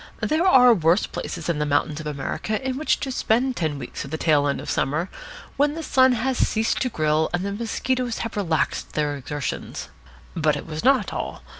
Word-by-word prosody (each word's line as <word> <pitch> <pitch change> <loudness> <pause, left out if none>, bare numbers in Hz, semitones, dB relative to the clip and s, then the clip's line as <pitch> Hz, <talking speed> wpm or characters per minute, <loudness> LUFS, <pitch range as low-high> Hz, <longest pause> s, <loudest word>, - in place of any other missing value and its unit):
There 320 +4 +2
are 250 -8 +7
worse 170 0 +3
places - - -6
than 170 -3 -1
the 150 - +1
mountains 145 +1 0
of 155 - -6
America 150 +9 -3
in 260 - -1
which 305 +3 +1
to 270 - -2
spend 250 +1 +1
ten 155 -7 -1
weeks 125 -3 -6
of 140 - -8
the 160 - -3
tail 150 -3 +3
end 140 - -1
of - - -8
summer, 155 +7 -1 0.5
when 290 +1 +2
the 325 - -5
sun 260 -3 +4
has 250 +2 -1
ceased 220 +1 +1
to 255 - +1
grill 155 -4 +1
and 180 +2 -2
the 200 - -2
mosquitoes 240 +2 -2
have 230 - -6
relaxed 170 -6 -1
their 150 -1 0
exertions. 145 +1 -5 0.5
But 155 -3 +2
it 145 - -6
was 155 -1 -5
not 260 -6 +3
all. - - -5
185 Hz, 205 wpm, -23 LUFS, 150-255 Hz, 0.5 s, are